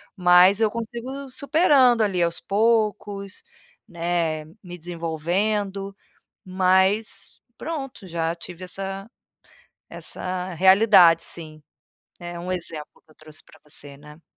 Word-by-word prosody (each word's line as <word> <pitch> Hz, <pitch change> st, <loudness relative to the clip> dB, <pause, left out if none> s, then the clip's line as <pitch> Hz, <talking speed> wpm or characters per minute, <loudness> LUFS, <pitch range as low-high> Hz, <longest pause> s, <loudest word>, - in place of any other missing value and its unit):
mas 180 Hz, +2 st, +6 dB
eu 220 Hz, -, +3 dB
consigo 240 Hz, +5 st, -6 dB
superando 280 Hz, -5 st, +4 dB
ali 185 Hz, -4 st, 0 dB
aos 170 Hz, 0 st, 0 dB
poucos, 210 Hz, -2 st, 0 dB, 0.5 s
né, 170 Hz, -2 st, -2 dB, 0.2 s
me 175 Hz, -1 st, -9 dB
desenvolvendo, 185 Hz, +4 st, -2 dB, 0.5 s
mas, 190 Hz, +3 st, +1 dB, 0.2 s
pronto. 270 Hz, -9 st, -6 dB
Já 165 Hz, -1 st, -2 dB
tive 175 Hz, +1 st, -10 dB
essa 195 Hz, +3 st, -6 dB, 0.8 s
essa 185 Hz, 0 st, -5 dB
realidade, 190 Hz, -2 st, +6 dB
sim. 155 Hz, -3 st, -7 dB, 0.6 s
É 175 Hz, -1 st, -7 dB
um 180 Hz, +2 st, -5 dB
exemplo 165 Hz, -4 st, -6 dB
que 155 Hz, -, -24 dB
eu -, -, -23 dB
trouxe 155 Hz, 0 st, -12 dB
pra -, -, -20 dB
você, 145 Hz, -1 st, -6 dB
né. 150 Hz, +3 st, -15 dB
185 Hz, 115 wpm, -23 LUFS, 170-210 Hz, 0.8 s, mas